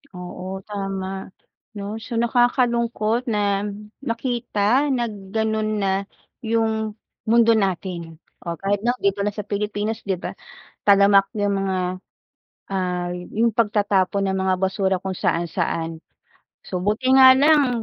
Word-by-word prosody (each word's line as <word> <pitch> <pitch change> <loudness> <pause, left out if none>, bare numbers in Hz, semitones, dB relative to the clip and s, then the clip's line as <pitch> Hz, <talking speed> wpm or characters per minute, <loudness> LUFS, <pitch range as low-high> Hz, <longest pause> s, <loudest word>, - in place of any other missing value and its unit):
Oo, 185 +1 -7
tama, 195 -2 -4 0.7
‘no? 205 +2 -5
So, 240 - -5
nakakalungkot 235 -1 +1
na 205 -2 0 0.3
makita, 240 0 0
na 240 - 0
gano'n 215 +2 -2
na, 195 - +1 0.5
yung 220 -2 0 0.3
mundo 230 0 +5
natin 180 -5 -2 0.2
o 170 -1 -5
kahit, 195 +3 -1
’no, 240 +2 +1
dito 200 0 +1
lang 205 0 -1
sa 210 - -4
Pilipinas, 210 +2 -2
‘di 190 - +1
ba? 175 - -6 0.6
Talamak 200 0 +6
yung 205 -1 +1
mga, 190 -1 -1 1.0
ah, 180 -2 -1
yung 215 +6 -1
pagtatapon 205 -3 +1
ng 190 0 0
mga 190 0 +2
basura 190 0 +1
kung 190 0 -3
saan-saan. 165 -1 -1 0.6
So, 185 - -3
buti 215 +7 0
nga 260 0 +9
lang 275 -5 +4
205 Hz, 125 wpm, -22 LUFS, 190-230 Hz, 1.0 s, nga